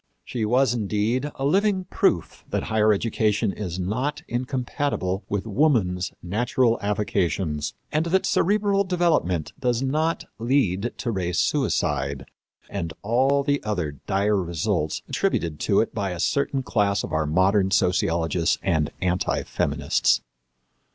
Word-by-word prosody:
She 115 -3 -2
was, 125 +2 +3
indeed, 115 +5 0
a 135 - -3
living 195 +4 +2
proof 180 - 0
that - - -1
higher 110 -1 +3
education 105 -1 +1
is 90 -5 -5
not 125 - -2
incompatible 125 -5 -2
with 100 0 -2
woman's 105 -8 +1
natural 115 +5 +1
avocations; 95 -7 -1 0.2
and 155 +2 +1
that 190 +3 +2
cerebral 200 +1 +2
development 170 - 0
does 125 0 0
not 155 +5 0
lead 115 -4 +1
to 120 - -2
race 90 -4 -2
suicide 70 0 0 0.4
and 85 -6 -4
all 135 +6 +2
the 145 0 0
other 90 -10 -3
dire 100 +1 +2
results 85 -2 -1
attributed 80 -3 -1
to 100 - +3
it 115 - -3
by 100 -3 -2
a 90 -2 -5
certain 140 +5 0
class 105 -4 +1
of - - -6
our 80 -1 +1
modern 95 +4 +3
sociologists 85 -2 +1
and 80 -6 +1
anti 90 0 0
feminists. - - +1
105 Hz, 130 wpm, -24 LUFS, 90-135 Hz, 0.4 s, was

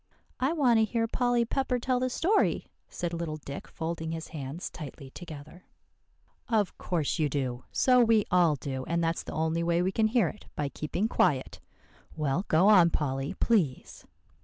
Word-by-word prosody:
"I 265 +3 +1
want 255 -8 +4
to - - +4
hear 225 +1 0
Polly 245 0 +1
Pepper 260 +1 0
tell 250 +1 0
the 255 0 0
story," 370 - +1 0.2
said 175 -1 -4
little 165 -2 -3
Dick, 140 -1 -8
folding 160 0 -4
his 165 0 -6
hands 145 +2 -6
tightly 140 -3 -9
together. 160 +1 -10 0.8
"Of 215 -5 +1
course 165 -2 -1
you 150 -2 +2
do, 130 -3 -3
so 250 -1 +4
we 225 -2 +3
all 175 -4 +4
do; 130 -2 -5
and 170 +1 0
that's 165 0 0
the - - -8
only 160 +1 0
way 170 +1 +1
we 190 - +1
can 220 +3 +2
hear 220 -4 +2
it 210 - -13
by 145 -2 -2
keeping 175 +9 -2
quiet. 150 - +1 0.6
Well, 155 +4 -1
go 165 +5 +4
on, 180 -5 +7
Polly, 135 -3 -2
please." 180 - 0
170 Hz, 175 wpm, -28 LUFS, 150-225 Hz, 0.8 s, on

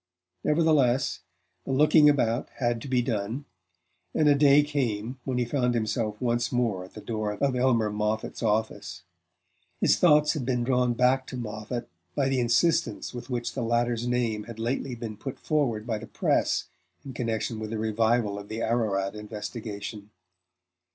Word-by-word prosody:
Nevertheless, 150 -5 +2 0.4
the - - -4
looking 150 +2 +6
about 120 -4 +1
had 120 -2 -1
to - - -7
be 125 -2 +2
done; 115 +4 -2 0.7
and 155 - +3
a 145 - +7
day 140 0 +6
came 130 -4 -2
when 130 -2 -1
he 125 - +1
found 125 0 0
himself 110 -1 -1
once 120 -1 0
more 115 -7 0
at 95 - -13
the - - -8
door 110 -2 -2
of 135 +5 0
Elmer 120 -4 +2
Moffatt's 105 +1 -2
office. 110 -1 -1 0.8
His - - +4
thoughts 150 -3 +5
had 150 -5 -3
been 125 -1 0
drawn 125 -1 +2
back 130 +2 +2
to 130 - -6
Moffatt 115 +1 -5 0.3
by 135 -1 +1
the 135 -1 +1
insistence 120 +8 +1
with 120 +1 -8
which 120 -2 -2
the 135 - -3
latter's 120 0 0
name 115 -4 0
had 115 -2 -9
lately 120 +3 -2
been 115 -2 -6
put 135 +5 -6
forward 125 -8 0
by 110 -3 -2
the - - -9
press - - 0 0.4
in 135 - -7
connection 115 -2 -2
with 110 0 -5
a 110 - -2
revival 110 -1 +1
of 100 - -11
the 110 +1 -4
Ararat 105 -4 0
investigation. 105 -1 -6
120 Hz, 165 wpm, -27 LUFS, 110-130 Hz, 0.8 s, a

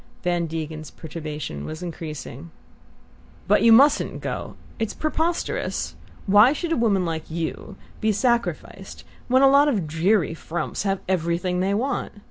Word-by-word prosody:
Van 175 -1 0
Degen's 155 -1 -5
perturbation 150 - -6
was 155 - -6
increasing. 160 -3 -7 1.0
"But - - +4
you 230 - +6
mustn't 275 +6 +5
go - - -5 0.2
it's 225 -2 -2
preposterous! 320 +2 -2 0.3
Why 210 +7 +6
should 335 +2 -4
a - - +3
woman 205 -6 +2
like 160 -1 -4
you 165 +5 -4 0.2
be 220 - +2
sacrificed 235 +3 -2 0.2
when 260 +2 +4
a - - +8
lot 280 +2 +6
of 210 - 0
dreary 165 +3 +1
frumps 165 0 -4
have 195 -1 -1
everything 180 0 0
they 195 +2 +1
want? 265 +6 -2
185 Hz, 140 wpm, -23 LUFS, 160-230 Hz, 1.0 s, a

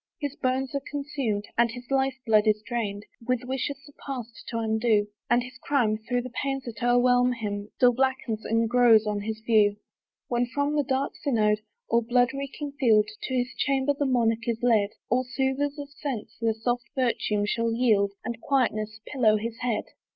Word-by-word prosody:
His 290 -3 -3
bones 260 -2 -1
are 280 - -1
consumed, 275 -8 -2
and 235 0 +5
his 245 +2 -9
life 270 -1 +2
blood 215 -1 +4
is 215 0 +2
dried, 210 -4 -3 0.2
With 250 -1 +1
wishes 265 +2 -2
the 290 - -15
past 245 -5 -6
to 230 - -3
undo; 220 -1 +2 0.2
And 240 0 +3
his 260 +1 -11
crime, 230 -7 +1
through 245 +2 -2
the 255 - -7
pains 270 +1 -2
that 235 -4 -8
o'erwhelm 245 +1 +4
him, 205 -3 -4
descried, 210 - -23
Still 245 -1 +5
blackens 255 -3 -1
and 225 +1 +1
grows 235 -2 +5
on 210 -1 -1
his 220 +1 -4
view. 215 -3 +3 0.5
When 240 -2 0
from 285 +3 -1
the 295 - +3
dark 270 0 -1
synod, 215 -6 +2 0.3
or 235 - +3
blood 245 +2 +2
reeking 280 +1 -5
field, 215 -5 +4 0.2
To 260 - -2
his 250 +1 -1
chamber 275 0 +1
the 285 0 -1
monarch 230 -2 +1
is 230 0 -2
led, 220 -4 +4 0.2
All 250 +2 +2
soothers 265 +3 -1
of 285 -1 -7
sense 270 -7 -5
their 225 -1 +1
soft 240 +2 -1
virtue 230 -5 +1
shall 230 +2 0
yield, 215 -4 +2
And 235 -1 -4
quietness 215 -6 0
pillow 225 -6 +3
his 230 +2 -5
head. 240 -3 -1
245 Hz, 190 wpm, -26 LUFS, 220-265 Hz, 0.5 s, and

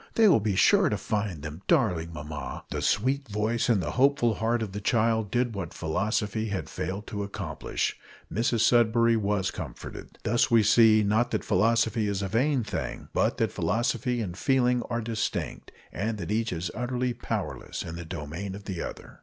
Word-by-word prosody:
They 225 -1 +6
will 170 - +6
be 105 -2 -1
sure - - +5
to - - 0
find 100 -8 -2
them, 75 +3 -7
darling 90 - +2
mamma!" 75 -3 -6
The - - -2
sweet 135 +6 +1
voice 110 +3 0
and 105 -6 +3
the 75 - -2
hopeful 130 -2 +3
heart 115 +2 0
of 105 - -5
the 105 +1 -5
child 110 0 +2
did 120 +2 0
what 100 - -5
philosophy 105 +6 -1
had 100 -3 -4
failed 100 +2 -4
to 105 - -4
accomplish 100 0 -3 0.3
Mrs 115 +1 +1
Sudberry 115 0 +4
was 100 -4 0
comforted. - - -8
Thus 120 +3 +2
we 115 -3 +5
see, 110 0 +6
not 110 +4 +2
that - - -2
philosophy 110 +2 +2
is 100 -1 -1
a - - -1
vain 125 +5 +1
thing, - - -5
but - - +1
that - - +1
philosophy 120 +1 0
and 90 -5 -4
feeling 125 +1 +2
are 115 0 -1
distinct, 110 -1 -3 0.2
and 110 +4 -2
that 95 -1 -5
each 115 +1 0
is 85 0 -3
utterly 125 0 -1
powerless - - -4
in 80 - -6
the 85 - -6
domain 85 +4 -5
of 100 - -9
the 95 -4 -4
other. - - -8
110 Hz, 185 wpm, -27 LUFS, 100-120 Hz, 0.3 s, They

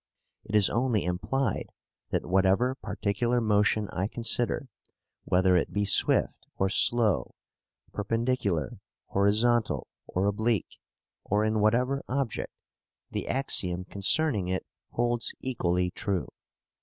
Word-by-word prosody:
It 105 - -5
is 105 -2 +6
only 115 -4 0
implied 105 +9 -1 0.4
that - - -1
whatever 95 +7 +2
particular 120 0 -1
motion 105 -1 +2
I 95 +2 -2
consider, 120 +3 -1 0.6
whether 90 0 +3
it 90 - +1
be 100 0 +1
swift 100 - +2
or 95 0 +1
slow, 105 - +3 0.6
perpendicular, 105 - -1 0.3
horizontal, 105 - +2 0.2
or 95 +2 -1
oblique, 110 0 -1 0.4
or 105 +2 +1
in 110 0 +1
whatever 125 +6 +2
object, 130 -2 -2 0.6
the - - -4
axiom 90 -9 +1
concerning 105 - +1
it 95 0 -2 0.2
holds 120 0 -1
equally 90 -8 -1
true. 95 -2 -2
105 Hz, 110 wpm, -28 LUFS, 95-120 Hz, 0.6 s, is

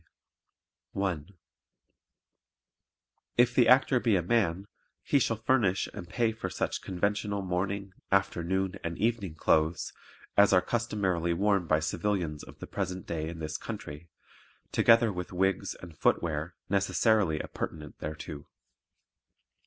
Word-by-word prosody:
(1) 90 -5 -2 2.1
If 120 0 +5
the 125 -1 +5
Actor 130 +1 +5
be 115 -4 +2
a 90 - +1
man, 95 -2 +1 0.4
he 140 - +3
shall 115 -2 +1
furnish 110 -5 +2
and 85 - -8
pay 115 +5 +1
for 110 - -5
such - - -2
conventional 100 +2 -1
morning, 95 +2 -2 0.2
afternoon 95 0 0
and 85 0 -3
evening 105 -6 -1
clothes 80 +1 +1 0.4
as 100 -1 +6
are 90 - +6
customarily 95 -8 0
worn 100 -2 +2
by 80 0 +3
civilians 80 -1 -1
of - - -12
the - - -7
present 90 0 -4
day 80 -1 -3
in 85 - -7
this 80 -1 -4
country, 75 +4 -7 0.6
together 115 -2 +5
with 90 -1 -5
wigs 95 +2 0
and 85 -3 -11
footwear 80 +2 0
necessarily 100 -3 +2
appurtenant 75 -1 -6
thereto. 75 -1 -6
95 Hz, 125 wpm, -29 LUFS, 85-105 Hz, 2.1 s, as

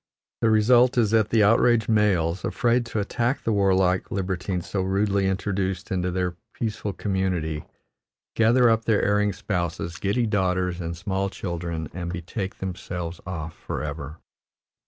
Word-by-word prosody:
The 115 - +4
result 120 +4 +5
is 110 -3 +3
that 110 -2 +3
the 110 -2 +4
outraged 115 +1 +4
males, 95 -6 +2
afraid 120 0 +1
to 110 - -2
attack 120 +5 -1
the 115 - 0
warlike 95 -2 +2
libertine 95 -1 -2
so 95 +3 -3
rudely 100 +1 +1
introduced 95 -1 -2
into 90 -1 0
their 90 -1 -1 0.2
peaceful 105 -2 -3
community, 90 -6 -2 0.7
gather 120 +2 +5
up 115 -1 +2
their 110 -2 +2
erring 105 0 +2
spouses, 85 -3 -3
giddy 105 +5 0
daughters, 90 -4 0
and 85 0 -4
small 95 +2 -1
children 85 -4 -4
and 85 -1 -4
betake 95 +3 -4
themselves 90 -2 -5
off 80 -3 -5
forever. 75 +2 -5
95 Hz, 140 wpm, -25 LUFS, 90-105 Hz, 0.7 s, result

